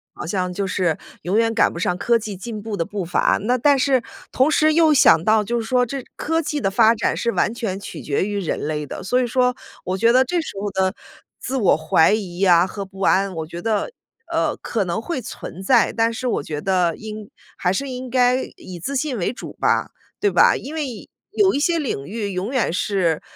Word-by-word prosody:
步 - - -21
好 - - -4
像 180 +1 -2
就 195 +2 -2
是 180 -3 0 0.2
永 185 +6 0
远 225 0 +2
赶 225 - +3
不 - - -7
上 180 0 0
科 235 +5 +2
技 210 -2 -6
进 215 +2 -6
步 215 0 -4
的 170 - 0
步 205 -2 -4
伐。 175 - +2
那 245 +5 +1
但 280 +2 +3
是 260 -2 +2 0.3
同 265 +4 +3
时 310 0 +3
又 320 -1 +5
想 215 - +6
到 215 +2 +3
就 235 +3 -1
是 225 - -4
说 250 0 +2
这 265 +2 -5
科 325 +2 0
技 300 -1 -3
的 195 - 0
发 220 +3 +5
展 225 - 0
是 235 - -1
完 225 - 0
全 210 -5 -3
取 - - -8
决 145 +5 -1
于 205 0 -2
人 180 - -2
类 150 0 -3
的， - - -7
所 250 +7 +1
以 - - +1
说， 250 +1 +1 0.3
我 185 +1 -1
觉 230 +4 +4
得 255 +2 +4
这 345 +6 0
时 320 - -6
候 205 - -2
的 190 0 0 0.5
自 265 - -4
我 205 -10 +3
怀 155 0 +3
疑 190 -5 -2
呀 180 -2 +5
和 200 +1 -6
不 190 0 -12
安， 195 0 +2
我 160 -1 -4
觉 170 +1 -7
得， 220 - -1 0.4
呃， - - 0
可 220 -4 -2
能 180 +3 -2
会 275 +1 -4
存 190 -4 -8
在。 235 +3 +3
但 230 0 +2
是 250 +2 -4
我 230 - -1
觉 150 0 -5
得 180 0 +1
应 215 -1 -8 0.3
还 180 - +1
是 275 +9 -2
应 255 0 -6
该 250 +1 +3
以 180 -2 -9
自 275 +9 -2
信 270 -2 -2
为 175 - -1
主 245 - -9
吧， - - 0 0.3
对 410 - +2
吧？ - - +5
因 290 - -8
为， 270 -8 -5 0.2
有 390 -2 +3
一 - - 0
些 335 +1 +2
领 245 - -3
域 205 +2 -4
永 185 +6 -3
远 255 -9 +1
是 180 -5 0
215 Hz, 250 characters per minute, -21 LUFS, 185-255 Hz, 0.5 s, 想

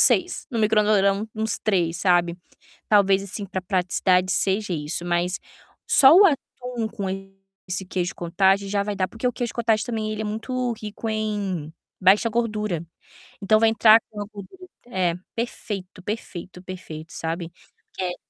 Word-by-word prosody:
6. 360 -1 +3
No 235 - -2
micro-ondas 215 -1 +3
vai 195 - +4
dar 200 0 +4
um 210 +2 -4
uns 220 0 -2
3, 175 -6 +1
sabe. 175 -2 +2 0.5
Talvez 195 -2 +4
assim 200 +1 -6
para 190 0 -3
praticidade 185 0 +1
seja 195 0 0
isso, 155 +1 -3
mas 175 +1 0 0.5
só 275 +2 +7
o 390 +4 +8
atum 250 - -1
com 200 -2 -5 0.6
esse 185 +1 -2
queijo 180 -1 -2
cottage 190 +3 +2
já 200 0 +1
vai 205 0 -3
dar, 185 -1 0
porque 230 +2 -4
o 245 - +2
queijo 240 -2 -3
cottage 225 -2 +1
também 220 -3 -3
ele 215 - -4
é - - -2
muito 245 +4 -2
rico 215 +1 -5
em 205 -7 -2 0.3
baixa 195 +5 +5
gordura, 215 -7 -1 0.6
então 215 +2 +4
vai 225 - +5
entrar 220 0 +6
com 210 - -7
a - - -4
gordura. 365 - -11 0.2
É, 185 -7 0 0.2
perfeito, 205 -5 -5
perfeito, 185 -3 -6
perfeito, 165 -4 -8
sabe. 165 +1 -4 0.4
Que 180 -1 -3
200 Hz, 165 wpm, -24 LUFS, 180-220 Hz, 0.6 s, o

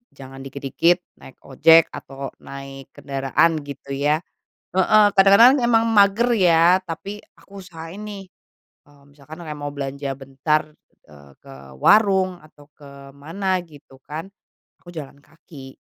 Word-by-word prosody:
jangan 135 0 -12
dikit-dikit 140 +6 -1 0.2
naik 130 - -14
ojek 160 +5 +4
atau 135 0 -8
naik 135 -1 -10
kendaraan 140 +4 0
gitu 140 0 -10
ya. 150 +4 0 0.5
Heeh, 210 +3 +4
kadang-kadang 200 +8 +7
memang 235 -2 +2
mager 200 +4 +4
ya 175 -1 +4
tapi 195 +5 -7 0.2
aku 200 0 -14
usahain 165 +1 -11
nih, 205 -2 -8 0.6
mmm, 145 -1 -23
misalkan 150 +4 -13
kayak 155 -2 -7
mau 145 - -5
belanja 140 0 -5
bentar, 135 +3 -1 0.5
eee, 70 -1 -17
ke - - -14 0.3
warung 190 -4 +3
atau 145 -1 -21
ke 145 - -15 0.3
mana 185 +6 -2
gitu 145 -4 -18
kan, 160 +5 -7 0.5
aku 175 - -16
jalan 140 -2 -9
kaki. 145 -3 -15
155 Hz, 130 wpm, -21 LUFS, 140-185 Hz, 0.6 s, kadang-kadang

